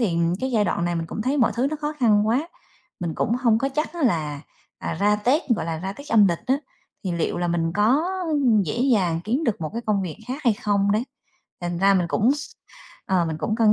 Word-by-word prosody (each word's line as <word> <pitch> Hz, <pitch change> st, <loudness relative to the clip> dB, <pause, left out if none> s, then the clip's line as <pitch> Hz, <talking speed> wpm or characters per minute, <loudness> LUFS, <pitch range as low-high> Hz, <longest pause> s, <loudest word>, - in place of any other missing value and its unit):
thì 175 Hz, -8 st, +1 dB, 0.2 s
cái 260 Hz, -, -1 dB
giai 215 Hz, -2 st, +3 dB
đoạn 170 Hz, -, -1 dB
này 175 Hz, -, -1 dB
mình 165 Hz, 0 st, -3 dB
cũng 215 Hz, -, -4 dB
thấy 265 Hz, +5 st, 0 dB
mọi 235 Hz, -, +3 dB
thứ 255 Hz, +3 st, +2 dB
nó 310 Hz, -, -2 dB
khó 300 Hz, +1 st, -2 dB
khăn 215 Hz, -3 st, +4 dB
quá, 275 Hz, +9 st, +1 dB, 0.5 s
mình 170 Hz, -3 st, -3 dB
cũng 230 Hz, -, 0 dB
hông 235 Hz, -3 st, +3 dB
có 270 Hz, +3 st, 0 dB
chắc 300 Hz, +5 st, -2 dB
á 335 Hz, -, -4 dB
là, 155 Hz, -, 0 dB, 0.4 s
à, -, -, -4 dB
ra 210 Hz, +1 st, +4 dB
Tết, 255 Hz, -, +2 dB
gọi -, -, -3 dB
là, 160 Hz, -1 st, -3 dB
ra 190 Hz, +3 st, -4 dB
Tết 285 Hz, +7 st, -12 dB
âm 215 Hz, -3 st, +6 dB
lịch 170 Hz, -, -3 dB
á, 265 Hz, +2 st, +3 dB, 0.5 s
thì 185 Hz, -, -1 dB
liệu 170 Hz, 0 st, -1 dB
là 175 Hz, 0 st, -1 dB
mình 165 Hz, -1 st, 0 dB
có 230 Hz, +9 st, +3 dB, 0.6 s
dễ 175 Hz, +8 st, -3 dB
dàng 175 Hz, -6 st, +1 dB
kiếm 255 Hz, +9 st, 0 dB
được 210 Hz, -6 st, -1 dB
một 155 Hz, -, -3 dB
cái 235 Hz, -, -3 dB
công 205 Hz, -3 st, +1 dB
việc 170 Hz, -4 st, -5 dB
khác 275 Hz, +5 st, -4 dB
hay 235 Hz, -, +5 dB
không 200 Hz, -1 st, +1 dB
đấy. 220 Hz, +3 st, +1 dB, 0.6 s
Thành 175 Hz, 0 st, -2 dB
ra 195 Hz, +1 st, +4 dB
mình 180 Hz, -2 st, +2 dB
cũng 225 Hz, +8 st, +3 dB
s 295 Hz, -, -7 dB, 0.6 s
ờ, 185 Hz, -3 st, +2 dB
mình 160 Hz, -, -3 dB
cũng 215 Hz, -, -1 dB
cân 220 Hz, -2 st, +5 dB
210 Hz, 250 wpm, -23 LUFS, 175-245 Hz, 0.6 s, âm